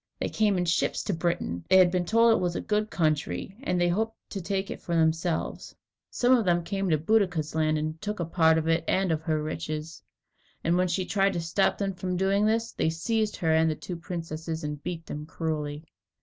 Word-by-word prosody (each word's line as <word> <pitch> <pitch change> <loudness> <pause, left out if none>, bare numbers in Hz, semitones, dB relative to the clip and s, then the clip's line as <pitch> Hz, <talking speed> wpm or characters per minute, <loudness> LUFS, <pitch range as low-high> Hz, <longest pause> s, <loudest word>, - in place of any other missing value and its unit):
They - - -1
came 210 -3 +2
in 180 - 0
ships 170 0 0
to 205 - -1
Britain. 160 - -2
They 190 - +7
had 180 -2 +6
been 180 -1 0
told 230 +4 +5
that 225 - +4
it - - -2
was 175 -1 -1
a - - -1
good 215 0 0
country, 160 +3 -1
and 180 -8 0
they 175 - +3
hoped 220 +5 -1
to 195 - -4
take 195 +2 -2
it - - -7
for 170 - -2
themselves. 165 +1 0 0.3
Some 250 +1 +3
of 235 - +2
them 175 -2 +2
came 195 +1 -2
to 155 - +3
Boadicea's 180 -3 +1
land, 155 -1 +1
and 155 +1 -3
took 210 -1 -4
a 170 - -1
part 160 -1 +3
of 160 0 -1
it 165 +1 +2
and 190 -2 +1
of 160 -1 0
her 155 -2 -1
riches. 155 0 -5 0.6
And 170 +1 +2
when 180 +1 +2
she 180 +2 -1
tried 195 0 +2
to 175 - -2
stop 165 +4 +1
them 195 -1 -1
from 180 0 -3
doing 195 +3 +2
this, 230 +1 0
they - - 0
seized 215 +6 -1
her 160 -2 +1
and 160 0 +4
the 155 - -1
two 180 - -6
princesses 165 -1 -5
and 150 -1 -4
beat 165 0 -5
them 150 +1 -6
cruelly. 155 -2 -3
175 Hz, 230 wpm, -27 LUFS, 160-195 Hz, 0.6 s, They